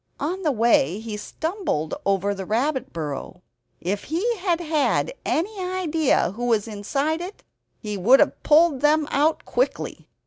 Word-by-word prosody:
On 350 +7 -2
the 315 -5 +1
way, 220 - +3
he 220 -1 -6
stumbled 315 - -3
over 200 +1 +1
the 195 -1 -5
rabbit 260 +6 -1
burrow. 150 -4 -6 0.4
If 200 +4 -3
he 390 - 0
had 355 -3 0
had 320 - +1
any 395 +6 -1
idea 330 - +1
who 240 +5 -4
was 225 -2 +1
inside 275 +10 -2
it 370 +3 -8 0.3
he 210 -2 -5
would 235 +9 +6
have 295 - +2
pulled 305 -3 +4
them 300 0 +3
out 305 +3 +1
quickly. - - -2
285 Hz, 150 wpm, -23 LUFS, 210-330 Hz, 0.4 s, would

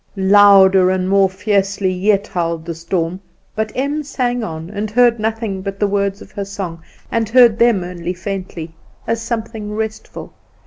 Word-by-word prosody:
Louder 195 -1 +6
and 185 0 0
more 195 0 +3
fiercely 195 0 0
yet 200 +2 +1
howled 170 -2 -3
the 170 - -4
storm; 170 +1 -3 0.4
but 215 0 -2
Em 285 +4 -1
sang 245 -4 -2
on, 160 -3 -6
and 210 +1 -3
heard 235 +1 +3
nothing 220 -3 -2
but 195 0 -6
the 210 - +2
words 200 0 -1
of - - -18
her 200 - -4
song, 190 -4 -6 0.3
and 225 -2 0
heard 235 -2 +5
them 235 -6 +3
only 175 0 -5
faintly, 180 -4 -6 0.3
as 230 0 -1
something 225 -2 -4
restful. 220 0 -6
200 Hz, 165 wpm, -18 LUFS, 185-220 Hz, 0.4 s, Louder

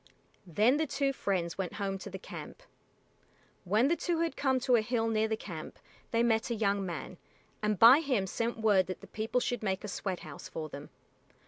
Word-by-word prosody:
Then 215 - +3
the 315 0 0
two 275 0 0
friends 185 -7 -2
went 185 -2 -2
home 195 -2 -3
to 200 - -7
the 190 - -6
camp. 190 - -9 1.0
When 215 +8 +3
the 335 - +3
two 340 -1 -1
had 330 -4 -1
come 265 -2 +1
to 250 0 +4
a 230 - +4
hill 225 +1 0
near 220 -1 +1
the 220 0 -1
camp 165 -7 -8 0.3
they 230 0 +2
met 225 -1 +2
a 235 - 0
young 200 -2 +1
man, 175 -3 -6 0.4
and 210 -1 +1
by 240 +7 +9
him 260 -11 0
sent 230 +5 -2
word 205 -4 +3
that 185 - -6
the - - -10
people 220 +3 -1
should 245 0 -2
make 195 -2 -1
a - - -4
sweat 190 -2 -3
house 155 -2 -9
for 155 -1 -5
them. 145 0 -9
215 Hz, 210 wpm, -31 LUFS, 190-245 Hz, 1.0 s, by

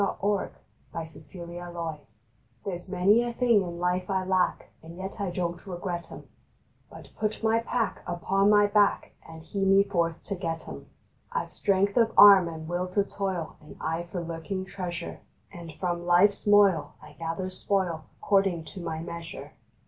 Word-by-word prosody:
December 200 0 0 0.5
Ninth 160 -1 -5
EARNINGS 170 -1 -7 0.6
HPHERE 200 - -2
S 175 +1 -7
many 190 +5 +4
a 240 0 -2
thing 235 -3 +3
in 175 -2 -5
life 180 +1 0
I 190 -1 +1
lack, 185 -1 0
And 165 +2 -11
yet 190 +1 -6
I 195 - -1
don 175 -1 -2
t 195 - -13
regret 175 -1 -4
em, - - -9 0.7
But - - -12
put 215 +1 -2
my 225 0 +3
pack 230 0 -2
Upon 195 +3 +1
my 205 0 +6
back 205 0 +2 0.2
And 160 0 -11
hie 200 +5 -5
me 195 0 +5
forth 170 -4 -1
to - - -4
get 165 -4 -4
em. - - -9 0.4
I 485 - -1
ve - - -19
strength 200 +1 +1
of 230 -2 +4
arm, 195 -3 +9
and 160 -1 -7
will 175 +2 -1
to 200 +2 +1
toil, 190 -5 -4
And 150 - -13
eye 165 +2 -2
for 175 -2 -3
lurking 170 +3 -4
treasure, 180 -3 -5 0.3
And 170 -3 -8
from 175 -1 -2
life 180 +4 +6
s 205 - -12
moil 200 -5 +5
I - - -14
gather 165 +3 -3
spoil 185 -4 -1 0.2
According 195 -4 +2
to 195 - -8
my 160 -2 -4
measure. 165 -4 -8
180 Hz, 180 wpm, -27 LUFS, 170-200 Hz, 0.7 s, arm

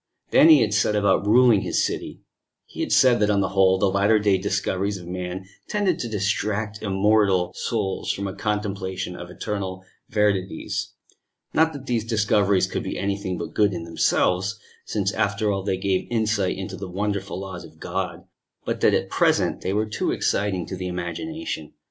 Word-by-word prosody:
Then 160 - +7
he 155 -4 +8
had 105 -2 +1
set 105 0 +2
about 100 0 +2
ruling 120 -2 +5
his - - +1
city: - - -5 0.4
he - - -13
had - - -2
said 125 -2 +5
that 105 0 +2
on 100 -1 +3
the 95 - 0
whole 95 -1 +4
the 100 - +2
latter 100 +3 +3
day 100 -2 +2
discoveries 100 0 -1
of 90 - -10
man 90 +1 -5 0.2
tended 195 -5 0
to 120 - -3
distract 105 +1 -1
immortal 100 -2 +2
souls 105 -5 -2
from 100 - -4
a 95 - -3
contemplation 95 -3 -3
of 85 0 -8
eternal 95 -2 -4 0.3
verities 100 -5 -1 0.6
not 160 +1 +4
that 140 -2 -8
these 120 -4 0
discoveries 105 -3 +2
could - - -3
be - - -4
anything 100 -2 -2
but - - -6
good 105 -2 +3
in 85 -2 -4
themselves, 90 +4 +1 0.3
since 100 -2 -1
after 105 0 0
all 95 -1 -1
they 95 -1 -1
gave 95 -1 -1
insight 110 -5 0
into 95 -1 -5
the 95 0 -7
wonderful 100 0 -3
laws 95 -2 -7
of - - -15
God - - -4 0.4
but - - -2
that - - +5
at - - 0
present - - +1
they 95 - -2
were 105 +2 +1
too 110 0 -2
exciting 95 -4 0
to 95 - -6
the 90 0 -4
imagination. 90 - -5
100 Hz, 180 wpm, -24 LUFS, 95-105 Hz, 0.6 s, he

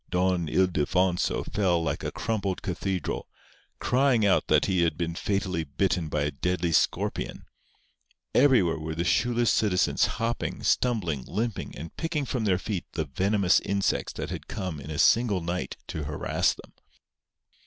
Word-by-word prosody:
Don 90 -1 +1
Ildefonso 90 +1 +1
fell 90 -5 +1
like - - -2
a - - -2
crumpled 100 -4 -2
cathedral, 95 -1 -3 0.5
crying 125 -4 +2
out 100 - +3
that - - +4
he 95 -2 +1
had 80 -2 +1
been 85 -1 -2
fatally 95 -2 -1
bitten 80 +3 -1
by 75 -1 0
a 75 - 0
deadly 90 0 -1
scorpion. - - 0 0.9
Everywhere 120 - +4
were 80 0 -4
the 85 - -1
shoeless 120 +6 +2
citizens 100 -4 +2
hopping, 115 +1 -2
stumbling, 90 - +1
limping, 115 -1 -3
and 80 +2 -8
picking 165 -4 -1
from 125 -4 -2
their 95 -3 +3
feet 95 -1 -4
the 80 -2 -1
venomous 95 +6 +2
insects 100 0 -1
that - - -5
had - - -6
come 95 -7 -4
in 70 +2 -9
a 75 - -4
single 100 +4 +4
night 85 +2 -3
to 75 -2 -4
harass 70 0 0
them. - - -15
90 Hz, 155 wpm, -27 LUFS, 85-105 Hz, 0.9 s, that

